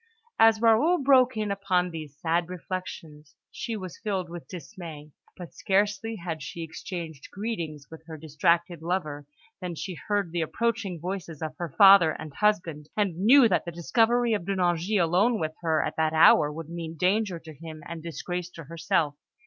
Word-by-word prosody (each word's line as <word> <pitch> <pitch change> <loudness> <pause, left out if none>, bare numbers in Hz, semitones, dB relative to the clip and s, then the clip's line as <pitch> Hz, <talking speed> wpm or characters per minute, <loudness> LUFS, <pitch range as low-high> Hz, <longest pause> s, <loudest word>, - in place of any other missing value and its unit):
As 225 -1 +6
Raoul 235 +10 +4
broke 255 -3 +5
in 210 -1 -1
upon 185 -2 0
these 155 -3 -8
sad 170 +2 0
reflections, 165 -4 -7 0.2
she 230 -2 -4
was 185 -4 -8
filled 190 -5 -3
with 175 -1 -8
dismay; 165 -5 -9 0.3
but 175 -2 -9
scarcely 210 +3 0
had 170 -5 -5
she 165 +4 -6
exchanged 160 -2 -7
greetings 170 -9 -5
with 160 0 -12
her 160 -1 -8
distracted 165 +2 0
lover 155 -5 -3 0.3
than 180 -2 -5
she 185 +4 -5
heard 200 0 -2
the 170 0 -1
approaching 215 0 -2
voices 175 -3 -5
of 155 -1 -5
her 175 -1 -4
father 195 -5 +8
and 155 -1 -8
husband, 170 -8 0
and 200 -5 +1
knew 240 +5 +7
that 185 - +1
the 170 - -6
discovery 230 +7 +2
of 205 - -1
De 200 - 0
Nangis 180 +3 +1
alone 200 +8 +2
with 155 0 -2
her 160 -2 +1
at - - -4
that 160 0 +1
hour 155 -1 +6
would 160 +1 -8
mean 165 -1 -6
danger 190 +2 +1
to 160 -1 -12
him 155 +1 -10
and 170 -1 -7
disgrace 175 +2 -5
to 165 -2 -11
herself. 165 0 -1
175 Hz, 175 wpm, -27 LUFS, 160-200 Hz, 0.3 s, father